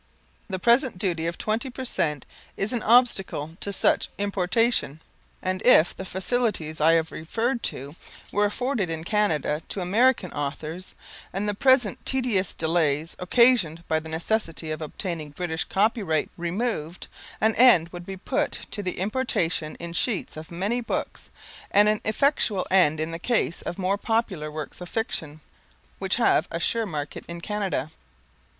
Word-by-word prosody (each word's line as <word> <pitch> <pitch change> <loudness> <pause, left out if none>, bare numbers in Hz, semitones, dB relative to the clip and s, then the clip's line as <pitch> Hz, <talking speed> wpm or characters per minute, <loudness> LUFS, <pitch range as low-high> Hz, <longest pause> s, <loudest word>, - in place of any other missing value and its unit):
The 190 - -2
present 235 +2 +3
duty 175 -4 0
of 170 - -3
20% 220 - -1 0.3
is 205 +5 -1
an 240 - -1
obstacle 195 - +3
to 200 - -3
such 195 - +2
importation, 200 - +1 0.4
and 185 0 -1
if 180 -9 +5
the 190 - -7
facilities 190 -5 -1
I 160 +2 +6
have 160 -1 +1
referred 230 +10 -2
to 140 +4 -9 0.4
were 205 +1 +2
afforded 230 -2 -1
in 160 -1 -4
Canada 165 -7 0
to - - -4
the 190 - -2
American 220 +1 +3
authors, 155 +5 -5 0.4
and 195 +3 -2
the 205 - +1
present 250 -1 +3
tedious 245 -8 0
delays 160 -1 0
occasioned 180 -5 +3
by 160 - +1
the 160 0 -10
necessity 165 -1 -2
of 155 - -4
obtaining 160 0 -4
British 160 +2 -3
copyright 195 -6 +1
removed, 175 -2 -3 0.3
an 220 +1 +3
end 220 -10 +6
would 175 0 -9
be 195 0 -6
put - - -1 0.2
to 205 - -2
the 185 -2 -4
importation 185 -7 -1
in 170 0 -7
sheets 215 +3 -1
of 155 0 -9
many 200 +8 -1
books, 230 - -4 0.4
and 205 +1 +5
an 215 0 +2
effectual 220 -4 +1
end 160 -5 +4
in 160 +1 -2
the 165 - -5
case 220 -5 0
of 175 - -5
more 195 +1 0
popular 200 -10 -1
works 155 +3 -7
of 175 - -7
fiction, 160 -9 -3 0.6
which - - 0
have - - +3
a 165 - -3
sure 225 +5 0
market 150 -4 -5
in 170 0 -6
Canada. 200 -4 -2
185 Hz, 155 wpm, -25 LUFS, 160-220 Hz, 0.6 s, I